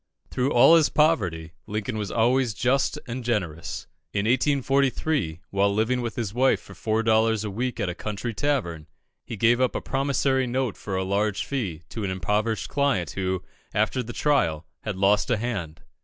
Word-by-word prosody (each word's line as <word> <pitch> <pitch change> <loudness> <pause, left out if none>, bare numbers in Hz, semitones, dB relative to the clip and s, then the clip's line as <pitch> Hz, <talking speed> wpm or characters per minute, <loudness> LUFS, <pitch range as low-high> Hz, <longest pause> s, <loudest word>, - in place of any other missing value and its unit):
Through 130 +3 0
all 140 +7 +7
his 160 - +3
poverty, 90 - +1
Lincoln 110 +3 -3
was 105 -2 -3
always 120 0 +2
just 130 +6 +1
and 125 +1 -5
generous. 95 -9 -2 0.3
In 100 0 0
1843, 135 - +1
while 100 +1 +2
living 115 +5 +1
with 120 -1 -4
his 110 -4 -3
wife 130 +3 +3
for - - -14
four 110 0 -1
dollars 110 -1 +3
a 105 - -4
week, 120 +4 -3
at 105 - 0
a 90 - -2
country 105 +5 -4
tavern, 100 - -1 0.4
he 115 - -5
gave 120 +4 +3
up 130 - +1
a - - 0
promissory 135 -1 0
note 125 -1 -1
for 100 - -5
a 95 - 0
large 100 +2 0
fee 95 - -3
to 110 - -5
an 100 - -1
impoverished 105 +2 -1
client 135 - 0
who, 95 -1 -2 0.3
after 130 - +1
the 120 0 -6
trial, 85 - +1 0.2
had 105 -3 -4
lost 100 +2 +3
a 120 - +2
hand. 85 -9 -4
110 Hz, 180 wpm, -25 LUFS, 100-130 Hz, 0.4 s, all